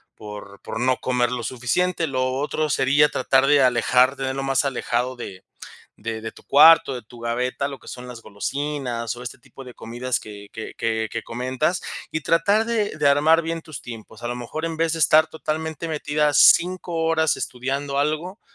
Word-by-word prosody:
por 105 -2 -10
por 110 - -6
no 125 +1 +2
comer 125 -1 0
lo 125 -1 -3
suficiente. 165 +10 -1
Lo 130 -2 -1
otro, 150 +3 -1
sería 145 +2 +3
tratar 135 +1 +2
de 145 -1 +5
alejarte 125 +2 +3
de 130 - -1
Lo 135 - -3
más 135 0 +1
alejado 130 -1 -1
de 95 -6 -8 0.5
de 110 +1 -5
de 110 - -6
tu - - -17
cuarto, 150 -1 +6
de 125 - -6
tu 120 +2 -15
gaveta, 125 +4 -2
lo 140 -1 -8
que - - -16
son 125 0 -8
las 120 -2 -10
golosinas, 120 +2 -3
o 120 - -9
este 125 - -8
tipo 135 +3 -14
de 125 -2 -11
comidas, 120 +2 -3
que 100 -1 -11
que 110 - -7
que 110 -1 -1
que 115 - -3
comentas. 130 +8 -2 0.3
Y 155 - -2
tratar 200 +8 +2
de 220 -7 -1
de 145 - +3
armar 155 +4 +4
bien 165 0 -3
tus 155 -5 -9
tiempos. 115 -1 -10
A 120 - -3
lo 120 - -2
mejor, 125 +6 -5
en 165 -1 -4
vez 165 0 +1
de 165 - -4
estar 155 +2 +5
totalmente 160 0 -4
metida, 150 -1 0
5 180 +3 +4
horas 160 -3 +2
estudiando 140 +3 -3
algo, 155 +7 -2
135 Hz, 195 wpm, -23 LUFS, 120-155 Hz, 0.5 s, cuarto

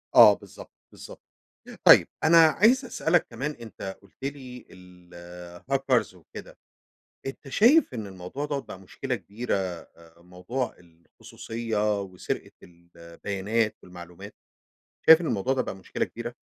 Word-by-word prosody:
آه - - +10
بالضبط - - -12 0.2
بالضبط، - - -12 0.6
طيب - - +8 0.2
أنا 165 +2 +6
عايز 235 - +3
أسألَك 175 -7 +1
كمان 130 +6 -4
أنتَ 110 -7 -9
قلت 100 +5 -22
لي 130 -3 -7
الهاكرز 90 +7 -4
وكده، 90 - -12 0.7
أنتَ 135 +1 -7
شايف 240 - +4
إن 110 -4 -5
الموضوع 95 +9 -7
دَوَّة 145 -2 -2
بقى 95 - -11
مشكلة 125 +7 -5
كبيرة 105 +5 -4
آآ 85 -3 -7
موضوع 100 +8 -5
الخصوصية 105 +5 -4
وسرقة 95 -2 -6
البيانات 90 +6 -4
والمعلومات، 90 -1 -12 0.7
شايف 160 +1 +9
إن - - -4
الموضوع 120 +2 0
ده 130 - 0
بقى 95 - -6
مشكلة 95 - -3
كبيرة؟ 120 +1 -8
105 Hz, 125 wpm, -26 LUFS, 90-135 Hz, 0.7 s, آه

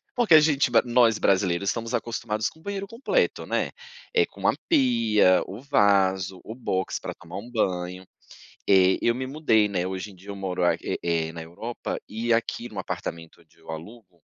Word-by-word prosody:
porque 240 -9 +3
a 155 - +11
gente 150 -3 +3
ba 115 - +6
nós 120 -2 +4
brasileiros, 95 0 +2
estamos 115 +1 -3
acostumados 110 -1 -2
com 160 - -21
o - - -21
banheiro 200 0 -4
completo, 230 +5 0
né? - - -1 0.5
É 440 -2 +5
com - - -18
uma - - +2
pia, 115 - +4
o 100 +6 -8
vaso, 95 -8 +2
o 110 - -8
box 95 -7 -2
para - - -6
tomar 90 +2 -10
um 115 +5 -8
banho, 90 -4 -1 0.7
eh, 95 -1 +5
eu 120 - +3
me 130 - -3
mudei, 130 -7 +2
né. 90 -3 -1
Hoje 95 +2 -5
em - - -16
dia 95 +3 -17
eu 100 - -6
moro 95 -2 -3
a 90 - +4
é - - -4 0.3
é - - -8
na 80 -1 -7
Europa 110 +9 -5
e 115 +2 -1
aqui 115 +1 -1
no 100 - -9
apartamento 85 -2 -6
onde 80 -2 -26
eu - - -21
alugo. 90 0 -11
105 Hz, 195 wpm, -25 LUFS, 95-120 Hz, 0.7 s, a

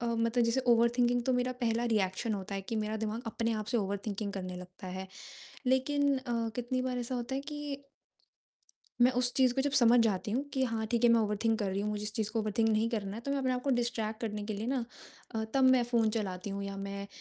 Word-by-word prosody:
अ, - - -3
मतलब 230 +1 +1
जैसे 230 +3 +2
ओवरथिंकिंग 240 +1 +3
तो 260 - +2
मेरा 250 0 +1
पहला 230 0 +1
रिएक्शन 210 +2 0
होता 200 0 -5
है 195 - -3
कि 225 +3 -4
मेरा 215 0 -1
दिमाग 220 +2 -3
अपने 230 +1 -1
आप 215 -1 -2
से 240 - 0
ओवरथिंकिंग 200 0 -2
करने 185 -2 -5
लगता 180 +1 -10
है। 185 +1 -5 0.6
लेकिन 280 +2 +2
अ, 235 -3 -2
कितनी 255 +1 -1
बार 255 -1 -2
ऐसा 245 +1 -2
होता 245 +1 -3
है 270 - -1
कि 290 -1 -6 1.2
मैं 250 - +7
उस 245 0 +5
चीज़ 255 -2 +4
को 270 - +1
जब 285 - +1
समझ 240 +1 +6
जाती 210 -2 +1
हूँ 255 +6 0
कि 265 - 0
हाँ 225 -3 -2
ठीक 240 0 +1
है, - - +7
मैं 230 - +5
ओवरथिंक 215 +1 +1
कर 205 - -1
रही 195 +1 -1
हूँ, 210 +1 -1
मुझे 210 0 -3
इस 210 0 -3
चीज़ 215 -1 -1
को 230 - 0
ओवरथिंक 215 +1 +1
नहीं 220 +1 +2
करना 205 -4 -3
है, - - -5
तो 275 - -5
मैं 280 - +1
अपने 260 -1 0
आप 250 0 -2
को 275 - 0
डिस्ट्रैक्ट 235 -3 -1
करने 210 -2 -3
के 215 - -3
लिए 210 +3 -4
ना 255 -2 0 0.5
अ, 220 - -1
तब 270 -1 +4
मैं 260 -1 +6
फ़ोन 235 -2 +2
चलाती 200 -3 -3
हूँ 200 0 -3
या 200 0 -5
मैं 200 0 -5
230 Hz, 250 wpm, -31 LUFS, 210-250 Hz, 1.2 s, मैं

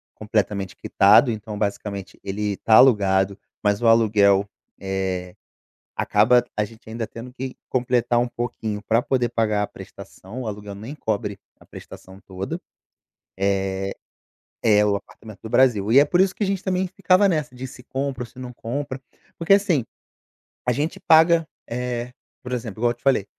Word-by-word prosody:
completamente 105 -3 -2
quitado, 105 +6 +5
então, 105 -1 -6
basicamente, 100 -3 -4
ele 100 0 -2
tá 110 - +1
alugado, 100 -5 +4 0.3
mas 105 +1 +1
o - - +4
aluguel, 105 -3 +4 0.3
eh, 95 -2 -3 0.6
acaba 120 +4 +3
a 105 - +1
gente 110 +2 -14
ainda 115 -1 -4
tendo 120 +2 -10
que 130 0 -6
completar 125 -1 +1
um 120 - +2
pouquinho 115 -3 -4
pra 115 +2 +2
poder 125 -1 0
pagar 110 -3 0
a - - 0
prestação, 115 +7 -10
o 115 - -4
aluguel 105 -1 -7
nem 110 +8 -8
cobre 105 -4 -3 0.2
a - - -18
prestação 95 +1 -12
toda. 95 0 -5 0.8
Eh, 95 0 -1 0.7
é 105 -2 +4
o 100 - +2
apartamento 110 +1 -12
do 110 - -7
Brasil. 120 -5 +3
E 135 - +7
é - - +6
por 175 +5 +1
isso 190 -1 +4
que - - -5
a - - +2
gente 195 -1 -1
também 185 0 0
ficava 190 +1 +3
nessa 155 -8 -1
de 125 +1 -6
se 125 0 -12
compra 135 -1 -3
ou - - -6
se 120 - -19
não 125 -1 -7
compra, 130 +3 -5 0.4
porque, 170 +4 +4
assim, 180 - +2 0.8
a - - +4
gente 145 +6 -2
paga, 165 0 +5 0.2
eh, 125 0 -3 0.3
por 125 - -7
exemplo, 115 -4 -4
igual 120 - +3
eu - - -6
te 120 - -34
falei, 135 -7 +2
115 Hz, 170 wpm, -23 LUFS, 100-130 Hz, 0.8 s, E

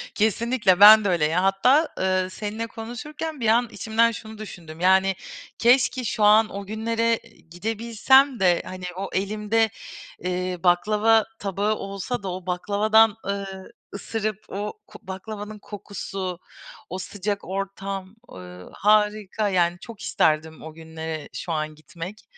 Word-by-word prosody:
Kesinlikle! 220 -2 +2
Ben 215 +1 +10
de - - +2
öyle 170 -4 +2
ya. 165 +4 +1
Hatta, 250 +11 +3
ııı, 185 0 +1
seninle 215 +4 -5
konuşurken 285 +8 -7
bir 230 - -1
an 235 +2 +4
içimden 230 +1 +2
şunu 220 0 -9
düşündüm, 170 -6 -10
yani 190 +1 +4 0.4
keşke 250 +2 +3
şu 220 -1 -1
an 215 +1 +6
o 200 0 -7
günlere 230 +2 0 0.4
gidebilsem 230 +7 +2
de, 180 -2 +3
hani 185 0 -7
o 195 +1 -4
elimde, 210 +3 +1 0.6
ııı, 180 -1 -2
baklava 210 +5 +3
tabağı 200 +2 -1
olsa 200 +4 -5
da, 190 - -3
o 180 0 -7
baklavadan, 210 +4 +3
ııı, 195 -1 -5 0.2
ısırıp 215 0 -3
o 205 +2 -4
ko 210 - -13
baklavanın 210 +2 -7
kokusu, 195 -3 -6 0.5
o 185 - -4
sıcak 200 +2 -4
ortam, 195 0 -5 0.2
ııı, 90 0 -11
harika. 210 0 +2
Yani 175 -2 +1
çok 225 0 -11
isterdim 160 +1 0
o 160 - -9
günlere 160 -1 -7
şu 175 - -5
an 155 -1 -2
gitmek. 170 +6 -9
200 Hz, 135 wpm, -24 LUFS, 185-220 Hz, 0.6 s, Ben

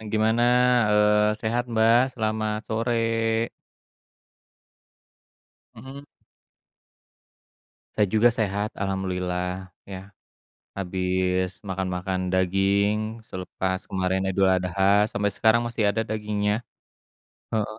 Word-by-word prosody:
e - - -12
gimana? 110 +2 +2 0.5
Eee, 105 0 +4
sehat, 120 +2 -1
Mbak? 115 +1 +4
Selamat 110 -2 -2
sore. 115 0 0 2.3
Mhm. 135 +5 -11 1.9
Saya 105 - +3
juga 110 +2 +5
sehat 105 -1 -1
alhamdulillah 90 -1 -3 0.2
ya, 95 - -5 0.8
habis 95 0 -1
makan-makan 95 0 -2
daging 100 +4 +1
selepas 95 0 -3
kemarin 95 0 -1
Idul 95 0 +2
Adha 95 +2 +2
sampe 105 0 0
sekarang 110 +3 +3
masih 115 -2 -2
ada 110 +2 -1
dagingnya. 105 -1 -1 1.0
Heeh, 110 -1 -2
105 Hz, 90 wpm, -25 LUFS, 95-110 Hz, 2.3 s, juga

